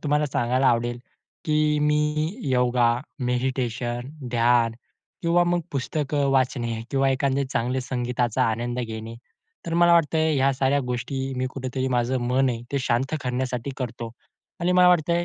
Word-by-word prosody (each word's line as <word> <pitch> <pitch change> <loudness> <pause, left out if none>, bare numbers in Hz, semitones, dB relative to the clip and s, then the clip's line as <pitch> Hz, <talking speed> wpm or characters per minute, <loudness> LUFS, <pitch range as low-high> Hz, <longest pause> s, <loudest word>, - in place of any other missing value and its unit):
तुम्हाला 150 +1 +2
सांगायला 130 0 +1
आवडेल, 120 0 +1 0.5
की 150 -1 +2
मी 150 0 +3 0.5
योगा, 125 -1 +3 0.4
मेडिटेशन, 125 -1 -2 0.3
ध्यान 120 0 +3 0.5
किंवा 175 +1 +3
मग 175 0 +1
पुस्तकं 145 +1 -1
वाचणे 120 -4 0
किंवा 135 0 +2
एखाद्या 135 0 +1
चांगले 125 +1 -1
संगीताचा 125 -2 -1
आनंद 120 +2 -2
घेणे. 110 -1 -6 0.5
तर 165 - -2
मला 175 0 +6
वाटतंय 160 -1 +2
ह्या 135 0 +3
साऱ्या 135 +2 +1
गोष्टी 125 +2 -3 0.2
मी 130 0 -1
कुठेतरी 130 0 -3
माझं 125 +1 +1
मन 130 +1 +3
आहे, 115 -1 -4
ते 140 - +1
शांत 130 +2 0
करण्यासाठी 125 +1 -2
करतो 120 -2 -5 0.5
आणि 180 +1 +1
मला 180 0 +6
वाटतंय 170 0 +2
130 Hz, 140 wpm, -24 LUFS, 120-145 Hz, 0.5 s, मला